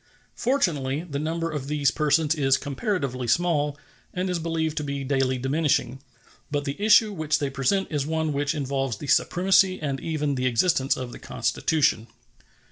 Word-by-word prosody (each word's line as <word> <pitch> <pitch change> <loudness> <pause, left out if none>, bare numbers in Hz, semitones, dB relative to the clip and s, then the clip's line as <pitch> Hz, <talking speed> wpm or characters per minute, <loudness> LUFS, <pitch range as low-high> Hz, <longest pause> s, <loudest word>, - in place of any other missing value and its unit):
Fortunately, 150 - 0
the 140 -3 -4
number 165 +2 -2
of 145 -3 -4
these 145 -1 +1
persons 150 0 +2
is 135 -4 +2
comparatively 140 - -3
small, 150 -2 +1 0.4
and 185 +1 -1
is 175 - -1
believed 160 -1 -2
to 150 - -1
be 140 -1 -3
daily 135 -1 0
diminishing; 135 -1 0 0.5
but 145 -1 -2
the 140 +7 -4
issue 215 0 +5
which 155 -3 0
they 140 -2 -2
present 135 +9 0
is 145 -3 0
one 160 -1 -1
which 145 +2 -1
involves 135 -5 -2
the 145 - -8
supremacy 185 +5 +3
and 140 -3 -3
even 150 -3 -2
the 130 -1 0
existence 130 +2 +2
of 125 -1 -5
the - - -10
Constitution. 140 -8 0
145 Hz, 165 wpm, -25 LUFS, 135-165 Hz, 0.5 s, issue